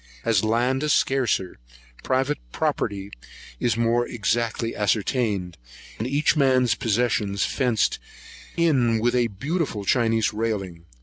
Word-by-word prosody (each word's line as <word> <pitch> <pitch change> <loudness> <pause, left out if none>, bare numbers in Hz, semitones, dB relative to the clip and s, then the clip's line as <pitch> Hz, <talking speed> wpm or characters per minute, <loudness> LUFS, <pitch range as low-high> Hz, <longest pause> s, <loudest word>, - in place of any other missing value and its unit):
As 110 -3 +2
land 120 +4 +1
is 150 -1 +2
scarcer, 120 - 0 0.4
private 135 +3 0
property 100 +7 -2 0.5
is 115 -1 0
more 115 +1 +1
exactly 115 +1 -1
ascertained, 105 -3 -1 0.4
and 110 - -2
each 145 +5 +2
man's 130 -5 +3
possession 115 -4 0
fenced 120 +1 +1 0.6
in 130 -9 +3
with 120 +2 +1
a 120 -1 +2
beautiful 130 - -3
Chinese 115 0 +2
railing. 100 -6 -3
115 Hz, 115 wpm, -24 LUFS, 105-130 Hz, 0.6 s, man's